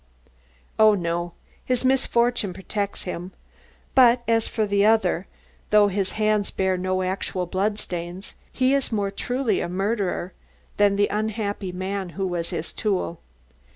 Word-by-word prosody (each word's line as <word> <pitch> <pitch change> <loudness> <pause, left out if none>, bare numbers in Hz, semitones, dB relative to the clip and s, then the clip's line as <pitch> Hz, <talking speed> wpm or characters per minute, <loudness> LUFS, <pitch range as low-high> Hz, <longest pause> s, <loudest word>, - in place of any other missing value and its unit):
"Oh, 215 -1 +7
no; 175 -1 -2 0.3
his 255 0 -1
misfortune 240 -5 +2
protects 200 +2 -4
him. 180 0 -6 0.6
But 245 -2 +6
as 225 -1 +2
for 220 -2 0
the 200 -1 +2
other, 195 -4 +3 0.4
though 210 -1 +5
his 195 -1 -1
hands 215 -1 +1
bear 190 -1 0
no 185 +1 -1
actual 185 0 -2
bloodstains, 185 -1 -3 0.2
he 260 +1 +2
is 275 -3 0
more 200 -3 0
truly 245 +1 -1
a - - -3
murderer 195 -1 -1 0.4
than 205 -1 +4
the 205 0 +3
unhappy 210 -2 -2
man 190 +1 -3
who 195 - 0
was 175 -2 -2
his 170 -2 -5
tool. 190 -5 -1
200 Hz, 140 wpm, -24 LUFS, 185-220 Hz, 0.6 s, Oh